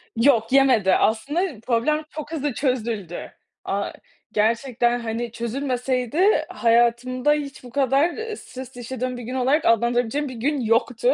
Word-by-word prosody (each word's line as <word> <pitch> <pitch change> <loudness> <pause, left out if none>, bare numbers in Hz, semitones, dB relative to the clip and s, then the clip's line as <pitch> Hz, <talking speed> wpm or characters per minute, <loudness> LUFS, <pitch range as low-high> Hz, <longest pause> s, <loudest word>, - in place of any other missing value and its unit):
Yok, 230 -1 +3
yemedi. 250 -9 +4
Aslında 285 - 0
problem 300 +6 +1
çok 305 0 -7
hızlı 290 -4 -2
çözüldü. 225 - -2 0.3
A - - -2 0.4
gerçekten, 240 +2 +1
hani, 230 0 -4
çözülmeseydi 255 - 0
hayatımda 240 +4 +2
hiç 280 -3 -5
bu 245 - -10
kadar, 275 +5 +2
ııı, 445 +3 -6
stres 260 0 -10
yaşadığım 250 +1 -4
bir 245 - -7
gün 250 +3 -5
olarak 265 +5 +2
adlandırabileceğim 240 +4 +1
bir - - -7
gün 280 +5 -1
yoktu. 240 - +2
250 Hz, 135 wpm, -23 LUFS, 230-285 Hz, 0.4 s, yemedi